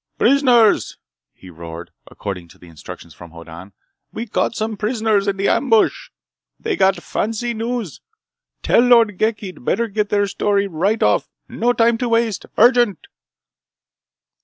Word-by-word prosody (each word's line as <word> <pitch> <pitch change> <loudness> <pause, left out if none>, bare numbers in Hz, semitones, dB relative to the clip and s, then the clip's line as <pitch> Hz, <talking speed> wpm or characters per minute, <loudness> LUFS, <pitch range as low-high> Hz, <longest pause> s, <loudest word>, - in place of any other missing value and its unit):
"Prisoners!" 250 -6 +3 0.3
he 95 - -15
roared, 85 0 -10 0.2
according 95 -4 -7
to - - -19
instructions 85 0 -12
from 85 - -13
Hoddan. 85 +3 -12 0.4
"We 230 - -5
caught 225 +1 -2
some 220 0 -3
prisoners 215 -2 0
in 195 -1 -1
the 195 - 0
ambush! 270 - +1 0.5
They 440 -3 -2
got 195 - +3
fancy 225 +2 -3
news! 230 - -4 0.6
Tell - - +3
Lord 230 -5 +4
Ghek 220 0 0
he'd 185 - -9
better 230 - 0
get 210 0 -2
their 205 -1 +1
story 200 0 0
right 195 +5 -1
off! - - +1 0.2
No 240 +1 0
time 230 -1 +2
to 245 - -2
waste! 230 -3 0
Urgent!" 240 - +3
210 Hz, 140 wpm, -19 LUFS, 180-235 Hz, 0.6 s, Lord